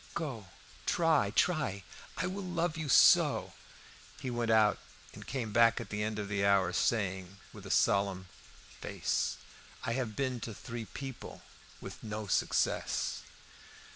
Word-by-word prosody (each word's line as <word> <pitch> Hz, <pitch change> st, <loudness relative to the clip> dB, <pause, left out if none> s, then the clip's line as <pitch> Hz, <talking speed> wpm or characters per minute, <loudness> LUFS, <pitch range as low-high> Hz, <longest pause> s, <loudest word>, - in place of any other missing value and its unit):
"Go, 125 Hz, -, -4 dB, 0.4 s
try, 160 Hz, -11 st, +3 dB
try! 140 Hz, -, +1 dB, 0.3 s
I 165 Hz, -, -1 dB
will 190 Hz, +2 st, -3 dB
love 175 Hz, -3 st, -1 dB
you 155 Hz, -3 st, -4 dB
so!" -, -, +5 dB, 0.7 s
He 130 Hz, -3 st, -4 dB
went 120 Hz, -1 st, -1 dB
out, 110 Hz, -1 st, +4 dB, 0.3 s
and -, -, -11 dB
came 120 Hz, -6 st, -3 dB
back 115 Hz, 0 st, +5 dB
at 115 Hz, -5 st, -8 dB
the 105 Hz, 0 st, -2 dB
end 110 Hz, 0 st, -2 dB
of 105 Hz, -1 st, -4 dB
an 100 Hz, -1 st, 0 dB
hour, 100 Hz, -3 st, +3 dB
saying, 95 Hz, -3 st, -1 dB, 0.2 s
with -, -, -8 dB
solemn 100 Hz, -2 st, +2 dB, 0.5 s
face -, -, -1 dB, 0.5 s
"I 115 Hz, -, -1 dB
have 120 Hz, -4 st, -3 dB
been 130 Hz, -3 st, -1 dB
to 110 Hz, -1 st, -6 dB
three 115 Hz, 0 st, -6 dB
people 135 Hz, +2 st, -8 dB, 0.4 s
with -, -, -9 dB
no 110 Hz, -1 st, -4 dB
success." 95 Hz, -, 0 dB
115 Hz, 140 wpm, -32 LUFS, 100-135 Hz, 0.7 s, so